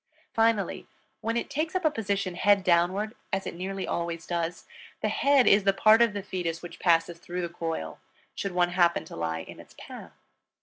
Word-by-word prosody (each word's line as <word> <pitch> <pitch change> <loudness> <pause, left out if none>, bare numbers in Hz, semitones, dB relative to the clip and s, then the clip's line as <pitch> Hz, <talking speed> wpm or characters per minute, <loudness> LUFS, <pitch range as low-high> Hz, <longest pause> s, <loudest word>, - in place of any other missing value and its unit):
Finally, 225 -4 +1 0.3
when 230 +1 -1
it - - -2
takes 310 +4 -3
up 370 -2 0
a 310 - +4
position 200 -6 -2
head 200 +2 +3
downward, 185 +5 +2 0.2
as 195 -1 -1
it - - -4
nearly 190 +2 -4
always 170 -1 -3
does, 170 0 -3 0.4
the - - 0
head 280 -2 +3
is 200 0 +5
the 195 0 +3
part 215 +3 +5
of 230 -3 +4
the 200 -1 -4
fetus 175 -4 -4
which 170 0 -9
passes 170 -1 +2
through 180 +1 -5
the 170 - -3
coil, 165 - -5 0.3
should 195 -2 -4
one 175 0 +2
happen 175 -1 +2
to - - -10
lie 80 0 -2
in - - -11
its - - -15
path. - - -10
185 Hz, 200 wpm, -27 LUFS, 170-210 Hz, 0.4 s, is